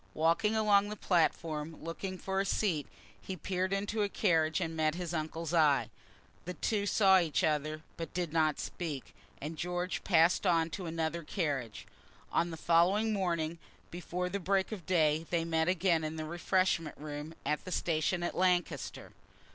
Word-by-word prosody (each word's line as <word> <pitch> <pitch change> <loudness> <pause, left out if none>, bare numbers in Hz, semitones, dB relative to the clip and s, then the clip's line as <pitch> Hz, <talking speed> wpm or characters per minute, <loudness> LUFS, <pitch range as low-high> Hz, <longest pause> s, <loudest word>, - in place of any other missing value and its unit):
Walking 170 +7 +2
along 205 -2 +4
the 210 - -4
platform, 160 -4 0
looking 185 +3 -5
for 190 +1 -2
a - - +2
seat, 180 -7 0 0.3
he 190 - -5
peered 185 +3 -2
into 205 +2 -1
a 205 - +1
carriage 160 -6 +2
and 165 -3 -3
met 155 0 +1
his 175 -1 -4
uncle's 160 +1 -3
eye. 150 -4 +3 0.5
The 180 +1 -5
two 205 +3 0
saw 195 -2 +5
each 165 -4 0
other, 155 0 0
but 165 - -5
did 175 -3 -3
not 155 -2 +2
speak, 155 -7 -5 0.3
and 155 +2 -6
George 180 +1 -2
passed 170 +2 +4
on 165 -2 +2
to 185 -1 -5
another 165 +1 -2
carriage. 145 - -3 0.5
On 170 - +1
the 165 - -6
following 185 +7 +3
morning, 170 -4 -1 0.3
before 180 +1 -3
the 200 +2 -3
break 190 +2 +1
of 190 -7 -7
day, 160 -3 +2
they 170 -1 0
met 160 -1 +1
again 180 -2 +2
in 155 +1 -3
the 155 -1 -4
refreshment 170 -1 0
room, 150 +1 -7
at 150 - 0
the 185 - -7
station 175 +1 0
at - - -1
Lancaster. 180 -1 0
170 Hz, 170 wpm, -32 LUFS, 160-185 Hz, 0.5 s, saw